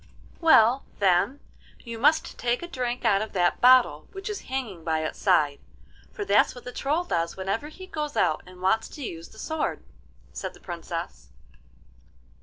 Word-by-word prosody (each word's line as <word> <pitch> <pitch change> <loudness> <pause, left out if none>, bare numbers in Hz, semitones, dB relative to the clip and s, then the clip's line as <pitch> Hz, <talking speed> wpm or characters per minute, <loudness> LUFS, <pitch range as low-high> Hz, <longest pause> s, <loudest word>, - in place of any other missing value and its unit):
'Well, 265 -6 +5
then, 200 +8 +2 0.4
you 230 -2 -7
must 305 +5 +3
take 240 +5 0
a - - -4
drink 250 -5 -3
out 200 -3 +4
of 220 - -5
that 175 -2 +1
bottle 245 -12 +5
which 390 +2 -5
is 415 - -5
hanging 235 -10 -4
by 160 -1 0
its - - -5
side, 150 -7 +3 0.5
for 410 - -5
that's - - +3
what 245 - -10
the 250 - -7
Troll 295 +7 0
does 170 - -2
whenever 195 +8 -2
he 370 +5 -10
goes 300 -5 -4
out 155 - +2
and 180 0 -14
wants 220 +4 +2
to 290 - -8
use 165 -7 -7
the - - -17
sword,' 315 +6 -3 0.5
said - - -5
the - - -16
Princess. 170 - -6
230 Hz, 175 wpm, -26 LUFS, 175-285 Hz, 0.5 s, Well